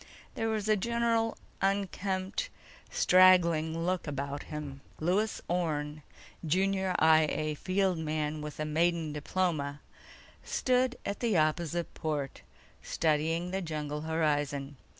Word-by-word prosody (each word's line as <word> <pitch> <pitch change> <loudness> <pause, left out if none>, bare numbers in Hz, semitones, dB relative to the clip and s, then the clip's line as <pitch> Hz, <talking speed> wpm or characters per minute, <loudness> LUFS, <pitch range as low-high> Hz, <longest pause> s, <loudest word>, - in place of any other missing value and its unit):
There 225 0 -1
was 215 -2 -1
a 215 - +5
general 230 +1 +1 0.2
unkempt, 195 - -1 0.4
straggling 170 -3 +4
look 180 -2 -1
about 140 0 -3
him. 145 -3 -6 0.2
Lewis 195 +7 0
Orne, 155 -4 -1 0.4
junior 190 +3 +1
I 160 -1 +5
A 155 0 -1
field 185 +2 0
man 155 -1 -2
with 150 0 -7
a 155 - -1
maiden 160 0 +1
diploma, 150 -2 -1 0.6
stood 255 0 +1
at 200 - -3
the 225 -6 +1
opposite 165 +2 0
port, 145 -4 -3 0.4
studying 165 +3 0
the 190 +1 -1
jungle 150 -3 -4
horizon. 145 -3 -1
165 Hz, 115 wpm, -30 LUFS, 150-190 Hz, 0.6 s, a